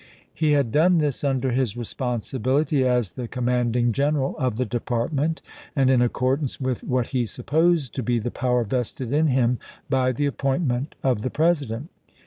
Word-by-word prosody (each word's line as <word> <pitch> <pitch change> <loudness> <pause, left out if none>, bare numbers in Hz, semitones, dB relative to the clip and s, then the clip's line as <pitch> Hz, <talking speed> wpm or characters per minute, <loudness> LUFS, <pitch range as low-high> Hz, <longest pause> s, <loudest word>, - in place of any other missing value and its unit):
He 155 -2 +2
had 140 -6 +2
done 170 +6 +4
this 150 -4 0
under 135 -2 +1
his 120 -3 0
responsibility 130 +4 -1
as 125 -6 +1
the 125 -2 -5
command 125 -1 0
ing 120 -1 +2
general 140 +2 0
of 130 -5 0
the 130 - 0
department, 130 +7 -1 0.3
and 135 -2 +4
in 125 -2 +4
accordance 130 +3 0
with 130 -3 -2
what 125 -1 -1
he 125 -3 0
supposed 155 - +1
to 130 - -3
be 120 0 0
the 120 +2 -2
power 125 -1 +1
vested 125 +2 -3
in 155 +2 +3
him 125 -3 +2 0.3
by 130 -1 +3
the 145 +4 -1
appointment 135 0 -1
of 125 -5 +1
the 130 - -2
President. 150 - 0
130 Hz, 170 wpm, -24 LUFS, 120-145 Hz, 0.3 s, done